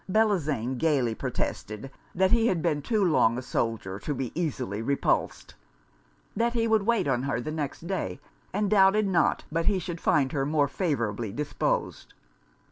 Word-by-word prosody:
Bellozane 155 - +1
gaily 140 -8 +2
protested 110 +3 -4 0.2
that 190 +1 +3
he 230 -1 +4
had 175 -7 0
been 155 -4 +1
too 210 +5 +1
long 125 -8 +3
a - - -3
soldier 115 -6 -2
to 145 +7 -3
be 130 -2 -3
easily 130 - -2
repulsed. 140 +4 -1 0.8
That 235 +1 +1
he 230 -1 +1
would 220 -2 +2
wait 235 -9 +2
on 130 -3 +1
her 135 -3 -1
the 140 +5 -4
next 155 +1 -4
day, 190 +1 -3 0.3
and 205 +2 0
doubted 205 +1 +4
not 180 -3 +2
but 165 +1 -1
he 205 - +3
should 175 -2 -5
find 140 -4 +2
her 140 -2 0
more 145 0 +2
favourably 120 - -2
disposed. 145 +6 -2
155 Hz, 165 wpm, -27 LUFS, 130-190 Hz, 0.8 s, he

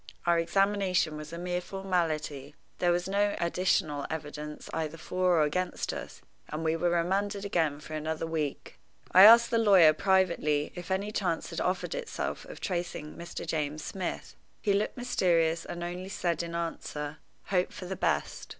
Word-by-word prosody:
Our 170 -1 +4
examination 190 -2 +1
was 150 0 -8
a 170 - -6
mere 180 +1 -2
formality. 160 -7 -2 0.2
There 175 -1 +3
was 175 +1 0
no 205 +1 +1
additional 170 -4 0
evidence 150 -1 -6
either 160 0 -3
for 180 +2 +1
or 155 - +5
against 180 +5 -1
us, - - -8 0.3
and 155 +2 -4
we 160 0 +1
were 175 +1 +1
remanded 195 +4 0
again 160 -7 0
for 155 - -10
another 155 +1 -2
week. 155 -3 -4 0.3
I 185 +2 +9
asked 235 +2 +8
the 230 - +3
lawyer, 190 -8 +7
privately, 170 -5 +2
if 175 0 -8
any 195 +2 -1
chance 180 -6 -1
had - - -3
offered 180 0 -1
itself - - -4
of - - -10
tracing 175 -4 -4
Mr. 170 0 -7
James 155 -1 -2
Smith. 190 -2 -5 0.2
He 205 - +1
looked 205 +5 0
mysterious, 170 -9 +1
and 175 0 -5
only 180 +2 -5
said 175 -5 -1
in 170 0 -5
answer, 150 -3 -4 0.3
"Hope 180 -2 +2
for 185 - -8
the 190 +1 -4
best." - - -1
175 Hz, 170 wpm, -29 LUFS, 155-190 Hz, 0.3 s, I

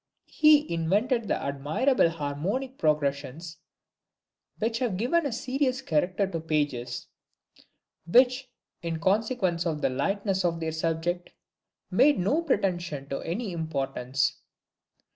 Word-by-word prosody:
He 305 - +5
invented 210 +8 +1
the - - 0
admirable 155 - +1
harmonic 170 - -3
progressions 150 +1 -1 1.0
which 225 +1 -1
have 230 -8 -1
given 290 - +1
a - - -4
serious 260 +2 -1
character 180 - +1
to 185 -4 -4
pages, 145 -6 -2 1.0
which, 255 +6 +4 0.3
in 165 -2 -3
consequence 190 -2 +1
of 150 -2 -3
the - - +2
lightness 195 +6 0
of 170 -2 0
their 160 -1 -2
subject, 165 +2 -2 0.6
made 265 +10 +5
no 255 - +1
pretension 175 - -1
to 135 - -2
any 200 +5 -3
importance. 140 -4 -1
175 Hz, 115 wpm, -27 LUFS, 155-240 Hz, 1.0 s, He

